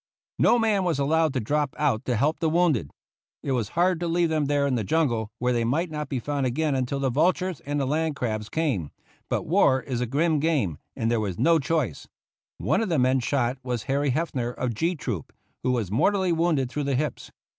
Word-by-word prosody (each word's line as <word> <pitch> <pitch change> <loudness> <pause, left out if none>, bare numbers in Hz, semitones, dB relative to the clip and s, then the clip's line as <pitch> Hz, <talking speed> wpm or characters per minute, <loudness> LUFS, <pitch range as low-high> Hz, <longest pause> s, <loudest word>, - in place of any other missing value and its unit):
No - - +5
man 215 -4 +2
was 175 -5 0
allowed 155 +3 +2
to - - +2
drop 145 +4 -1
out 140 -7 0
to 125 - 0
help 145 +8 +1
the 160 - +1
wounded. 155 - +2 0.5
It 140 - -2
was 120 -6 0
hard 180 0 +3
to 175 - -2
leave 170 0 +2
them 155 -2 +1
there 145 0 +1
in 140 - 0
the 115 -3 0
jungle, 120 -5 0
where 125 +1 0
they 120 -1 +1
might 155 +9 0
not 150 -2 -4
be 135 - -2
found 140 +2 -1
again 150 +4 0
until 130 +1 -1
the 135 -2 0
vultures 180 +4 +1
and 145 0 -1
the 135 - 0
land 155 +2 0
crabs 110 -5 -3
came, 135 - -1 0.4
but - - 0
war 130 - +4
is 125 -3 -3
a 125 - -1
grim 155 +5 +1
game 140 - 0 0.2
and 115 +1 -1
there 120 - +2
was 100 -5 -3
no 165 -1 +4
choice. 140 - -1 0.5
One - - +1
of 220 - -1
the 165 - +1
men 130 0 +3
shot 130 0 0
was 125 -3 -3
Harry 140 +1 0
Heffner 130 -4 -1
of 125 -1 -3
G 165 - 0
Troop, 115 - -5 0.3
who 130 - +1
was 115 -7 -1
mortally 190 - +2
wounded 165 -5 +1
through 145 0 -2
the 140 -1 0
hips. 150 +3 -3
140 Hz, 220 wpm, -25 LUFS, 125-160 Hz, 0.5 s, No